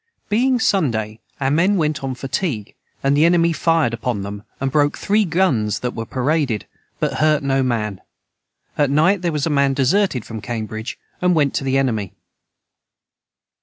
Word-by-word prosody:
Being 250 +4 +2
Sunday 115 - 0 0.2
our 135 -1 0
men 185 +7 +3
went 155 -3 -1
on 130 -1 -3
fatigue 130 - -3 0.3
and 135 +1 +3
the 150 - +4
enemy 170 0 +4
fired 165 -7 +2
upon 115 -3 -2
them 100 +1 -6 0.2
and 135 0 -1
broke 145 0 +2
three 210 +1 +2
guns 155 - +1
that 125 - -2
were 115 -1 -5
paraded 135 - 0 0.3
but - - -1
hurt 155 -1 +3
no 135 -1 +1
man 110 -6 -1 0.8
at 145 -2 +3
night 165 +7 +3
their 175 -2 0
was 150 -2 -1
a 165 - 0
man 140 -1 +2
deserted 140 - +1
from 110 -2 -7
cambridg 110 0 -5 0.2
and 180 -1 +3
went 145 -3 +2
to - - -1
the 135 0 +1
enemy. 110 -8 -1
140 Hz, 165 wpm, -20 LUFS, 115-165 Hz, 0.8 s, the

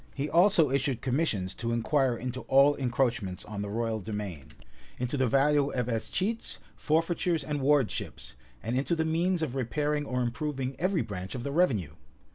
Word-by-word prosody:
He 140 +1 -2
also 170 -5 +5
issued 135 -2 0
commissions 125 - 0
to 115 -1 -3
inquire 125 +1 +1
into 125 +2 -4
all 140 +2 +6
encroachments 120 -7 -1
on 105 -1 -5
the 100 - -4
royal 110 0 -2
demesne; 100 -9 -5 0.5
into 125 +3 -2
the 130 -2 +2
value 140 +3 +3
of 125 -2 0
escheats, 185 - -2 0.2
forfeitures, 165 0 0
and 145 -1 -3
Wardships; 135 - 0 0.3
and 115 +2 -2
into 140 +6 +1
the 160 -1 0
means 170 +2 +1
of 140 -6 -2
repairing 145 +3 -1
or 125 0 0
improving 135 +1 -3
every 185 0 +1
branch 95 -1 -6
of 120 - -5
the 140 - -3
revenue. 130 - +1
135 Hz, 165 wpm, -29 LUFS, 115-150 Hz, 0.5 s, all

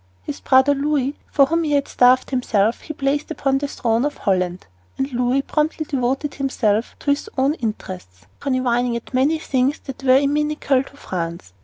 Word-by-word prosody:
His 290 - -6
brother 265 +2 +4
Louis, 285 -1 0 0.2
for 275 - +5
whom 330 +4 0
he 300 -2 0
had 280 -1 +2
starved 255 +2 +4
himself, 230 -4 +1
he - - -7
placed 285 0 -1
upon 270 -4 0
the 285 - -2
throne 230 -3 0
of 295 0 -2
Holland, 180 -2 -1 0.3
and 270 0 -2
Louis 250 +3 +1
promptly 310 +1 -1
devoted 270 +2 -1
himself 230 -5 0
to 285 - +1
his 285 +9 -1
own 270 +3 +3
interests, 185 - -6
conniving 250 -3 0
at 235 +3 -7
many 275 +5 +2
things 270 -2 0
which 270 -2 -7
were 260 -1 +5
inimical 290 -1 +1
to 280 +1 -13
France. 170 - -5
270 Hz, 175 wpm, -21 LUFS, 240-285 Hz, 0.3 s, for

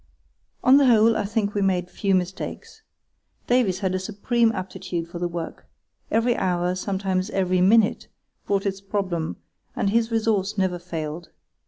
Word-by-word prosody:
On 260 +2 +7
the 280 -2 +5
whole 225 -1 +5
I 210 - -1
think 205 0 -1
we 205 - 0
made 180 -2 0
few 195 -2 +1
mistakes. 185 0 -4 0.6
Davies 230 -7 +2
had 190 -2 0
a 185 - 0
supreme 225 +4 +1
aptitude 180 -3 -5
for 170 0 -8
the 175 - 0
work. 170 -1 -6 0.4
Every 230 +2 +2
hour, 180 -1 0
sometimes 190 0 -2
every 185 -3 +1
minute, 210 +3 +3 0.4
brought 200 0 0
its 195 -1 -2
problem, 190 -5 -2 0.4
and 200 - 0
his 230 +1 +2
resource 215 -3 0
never 185 -2 0
failed. 165 -1 -6
195 Hz, 155 wpm, -24 LUFS, 180-215 Hz, 0.6 s, On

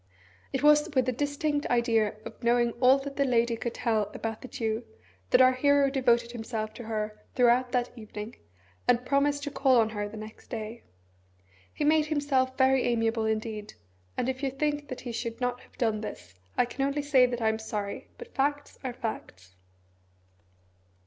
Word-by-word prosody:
It 270 - -2
was 300 +1 +6
with 260 -2 +4
the 255 - +1
distinct 290 +3 -1
idea 230 -3 +2
of - - -9
knowing 240 0 +3
all 260 +2 +6
that 275 0 -7
the 280 - +3
lady 235 -3 +2
could 235 +1 -4
tell 220 -3 0
about 225 -1 -4
the - - -8
Jew 225 -1 -2 0.5
that - - +6
our 255 0 +7
hero 280 +1 +3
devoted 240 -3 +2
himself 220 -2 -4
to 240 - -9
her 215 -1 -3
throughout 245 0 +4
that 245 -1 +1
evening, 215 -1 -8 0.5
and 245 0 +3
promised 285 +1 +2
to 290 - -3
call 265 -3 +4
on 220 -1 +3
her 205 -1 -3
the 215 - -9
next 215 0 -10
day. 220 +1 -6 0.9
He - - -3
made 305 +1 +4
himself 275 -4 +1
very 265 0 +4
amiable 225 -1 +1
indeed, 215 -1 -3 0.4
and - - 0
if 260 +1 -2
you 275 - 0
think 290 +2 -2
that 255 - -6
he 245 - -5
should 230 0 -4
not 245 -1 -1
have - - -21
done 220 -3 0
this, 155 - -8 0.2
I 245 - +4
can 255 +3 -3
only 280 +1 0
say 265 -3 +5
that 245 -1 -3
I 220 -1 +2
am 220 0 -1
sorry, 210 -2 -4
but 475 0 -11
facts 285 +1 -1
are 255 -2 -3
facts. 95 - -6
245 Hz, 185 wpm, -28 LUFS, 225-275 Hz, 0.9 s, our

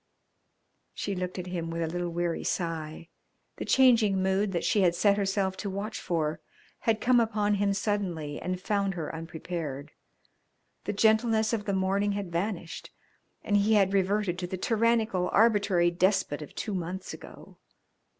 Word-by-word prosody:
She 200 - -3
looked 180 0 -4
at 180 - -4
him 175 -2 -4
with 165 0 -2
a - - -1
little 175 +1 -3
weary 170 0 -2
sigh. 165 -1 -3 0.5
The - - -4
changing 235 -7 +4
mood 190 +2 +1
that 170 -3 -2
she 205 - +2
had 175 -2 +3
set 200 +2 +3
herself 195 -1 0
to 205 - -4
watch 200 +3 -4
for 160 -3 -1 0.4
had 225 -1 +1
come 250 -1 +4
upon 215 -2 +1
him 200 0 +2
suddenly 180 -8 -2
and 180 +1 -3
found 200 -1 -1
her 160 -3 -4
unprepared. 160 -3 -6 0.9
The 205 - -2
gentleness 220 +1 +3
of 210 -3 -1
the 200 - -1
morning 195 +2 +1
had 200 -3 -4
vanished 170 0 -3 0.5
and 205 - +2
he 205 +2 +3
had 195 -2 +3
reverted 195 -1 +1
to 180 - -3
the 185 - -4
tyrannical, 225 -3 +1
arbitrary 200 -6 +3
despot 185 -4 +1
of 150 - -10
two 210 - -3
months 185 +1 -4
ago. - - -13
190 Hz, 160 wpm, -28 LUFS, 175-210 Hz, 0.9 s, changing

